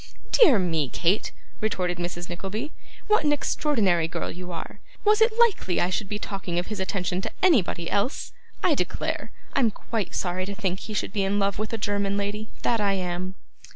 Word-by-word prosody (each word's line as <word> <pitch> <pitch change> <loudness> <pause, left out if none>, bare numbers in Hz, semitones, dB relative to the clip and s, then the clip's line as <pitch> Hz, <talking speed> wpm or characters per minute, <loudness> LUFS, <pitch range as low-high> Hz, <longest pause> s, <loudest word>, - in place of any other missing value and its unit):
'Dear 310 - +7
me, 165 -7 +1
Kate,' 180 +10 +1 0.3
retorted 180 -5 -1
Mrs. 175 0 -4
Nickleby, 200 - -4 0.3
'what 425 -6 +3
an 295 - +3
extraordinary 215 - +2
girl 170 0 -3
you 180 +1 -7
are! 165 - -6 0.3
Was 425 +1 +5
it 445 0 +4
likely 440 - +3
I 180 - +1
should 195 +2 -1
be 210 - -1
talking 195 -4 -4
of 175 - +1
his 215 -2 -5
attention 185 -1 -1
to - - -4
anybody 210 - +3
else? 205 - 0 0.3
I - - +5
declare - - -2 0.2
I'm 255 -5 +4
quite 210 -2 -3
sorry 185 0 -1
to 200 - -4
think 190 -1 -1
he 215 - -6
should 200 - -2
be 200 - +1
in 195 +1 +1
love 200 0 +1
with 215 0 -2
a 225 - -1
German 200 -1 0
lady, 205 +2 -3
that 230 -2 +2
I 200 -1 +3
am. 185 0 -2
200 Hz, 190 wpm, -26 LUFS, 180-220 Hz, 0.3 s, Dear